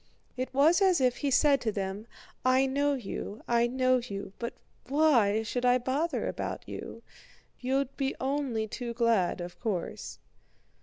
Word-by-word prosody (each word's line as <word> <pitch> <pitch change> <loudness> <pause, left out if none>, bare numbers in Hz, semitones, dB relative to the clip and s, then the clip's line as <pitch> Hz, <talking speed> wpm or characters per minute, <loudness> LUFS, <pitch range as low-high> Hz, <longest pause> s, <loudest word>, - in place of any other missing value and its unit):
It 255 +1 -3
was 310 +8 +4
as 375 -4 +4
if 255 -2 +2
he 285 - -1
said 275 0 +4
to 220 - 0
them: 200 +2 -4 0.4
"I 255 +1 +4
know 285 +2 +1
you, 220 -3 -6
I 235 0 +3
know 255 +1 +2
you, 200 -6 -6
but 235 0 -4 0.3
why 245 -8 +3
should 245 +3 -3
I 250 0 +5
bother 270 +7 -1
about - - -4
you? - - -8 0.6
You'd 270 +1 -1
be 270 -1 -1
only 265 -5 -1
too 235 +1 -5
glad, 225 -7 +2
of 175 0 -8
course." 205 -7 -4
250 Hz, 155 wpm, -29 LUFS, 225-275 Hz, 0.6 s, I